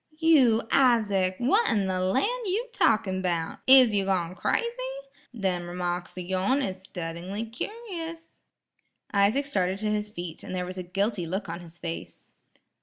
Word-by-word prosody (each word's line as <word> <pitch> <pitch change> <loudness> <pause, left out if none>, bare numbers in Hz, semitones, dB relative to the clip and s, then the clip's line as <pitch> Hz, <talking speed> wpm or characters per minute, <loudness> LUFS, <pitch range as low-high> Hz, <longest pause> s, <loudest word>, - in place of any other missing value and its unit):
"You, 285 -9 +5
Isaac, 210 -8 +3
wha' 340 - +3
in 205 -5 +1
the 185 -1 -1
lan' 190 +8 +2 0.2
you 445 +7 -1
talkin' 215 - +2
'bout? 170 -3 -2
Is 260 -4 +8
you 200 -1 +1
gone 180 -3 0
crazy? 330 - 0 0.7
Them 185 -7 -1
remarks 175 0 -3
o' - - -3
yourn 190 +10 0
is 185 -1 -4
suttingly 180 +5 -5
cur'ous." 335 - -6 0.8
Isaac 210 +8 +3
started 190 -8 0
to 210 +1 -1
his 210 0 -1
feet, 175 -5 -7
and 185 - -6
there 180 0 -2
was 185 +1 -6
a 180 0 -9
guilty 200 -4 0
look 190 +4 -3
on 170 +1 -4
his 170 -1 -13
face. 165 -1 -7
195 Hz, 160 wpm, -27 LUFS, 180-250 Hz, 0.8 s, Is